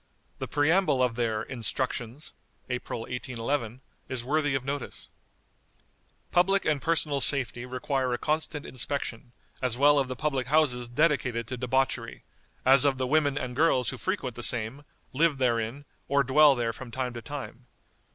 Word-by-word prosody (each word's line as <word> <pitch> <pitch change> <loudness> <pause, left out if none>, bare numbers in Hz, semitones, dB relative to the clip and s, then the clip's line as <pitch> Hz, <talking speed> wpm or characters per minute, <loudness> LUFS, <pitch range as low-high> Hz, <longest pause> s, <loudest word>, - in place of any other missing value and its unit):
The - - -3
preamble 150 -2 +3
of 125 -2 +1
their 115 -2 -1
"Instructions" 125 +2 -4 0.4
(April, 125 -2 -3
1811) 125 0 -3 0.3
is 125 -2 -4
worthy 145 0 +1
of 130 -1 -2
notice: 140 0 -5 1.2
"Public 195 +2 +3
and 150 -3 +1
personal 155 -4 +1
safety 125 -3 +1
require 130 0 -1
a 120 - 0
constant 155 +1 -2
inspection, 125 -2 -4 0.3
as 125 -2 0
well 145 +1 +5
of 135 - 0
the 130 - -4
public 135 -3 -1
houses 130 -5 +2
dedicated 125 -3 +1
to 130 - -3
debauchery, 130 +2 -1 0.4
as 130 0 +7
of 140 -2 +3
the 130 - -1
women 145 0 +2
and 125 -3 -3
girls 135 -4 +3
who - - -5
frequent 160 - -2
the 120 - -7
same, 120 +4 -2 0.3
live 155 +1 +2
therein, 120 +2 0 0.2
or 140 0 +3
dwell 140 +2 +6
there 115 -2 -1
from 130 +2 -9
time 125 +1 -3
to 120 - -6
time. 130 -2 -8
130 Hz, 155 wpm, -28 LUFS, 125-145 Hz, 1.2 s, as